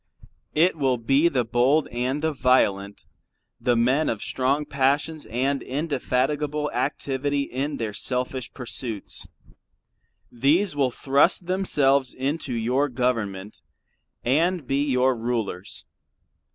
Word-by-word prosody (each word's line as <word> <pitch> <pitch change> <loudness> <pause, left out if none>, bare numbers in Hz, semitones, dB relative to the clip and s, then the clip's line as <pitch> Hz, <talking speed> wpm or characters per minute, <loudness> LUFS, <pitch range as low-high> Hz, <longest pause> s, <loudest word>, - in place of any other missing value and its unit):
It 165 +4 +4
will 135 -5 +1
be 135 +7 +3
the 125 -6 0
bold 125 +7 +2
and 130 +5 -2
the 160 -1 +1
violent, 100 -7 +1 0.5
the 120 - +2
men 130 +7 +2
of 110 - -3
strong 135 +3 0
passions 145 +3 0
and 130 +4 -1
indefatigable 150 +1 -1
activity 140 +2 -1
in 140 +2 -3
their 110 -2 -3
selfish 125 +2 -2
pursuits. 120 -4 -5 1.0
These 145 - +2
will 140 -3 +2
thrust 140 +8 +2
themselves 140 -8 +2
into 140 +2 -2
your 125 +5 0
Government 115 -6 -2 0.6
and 160 +5 +1
be 135 +2 0
your 130 -2 +2
rulers. 115 -5 -4
135 Hz, 110 wpm, -24 LUFS, 120-145 Hz, 1.0 s, It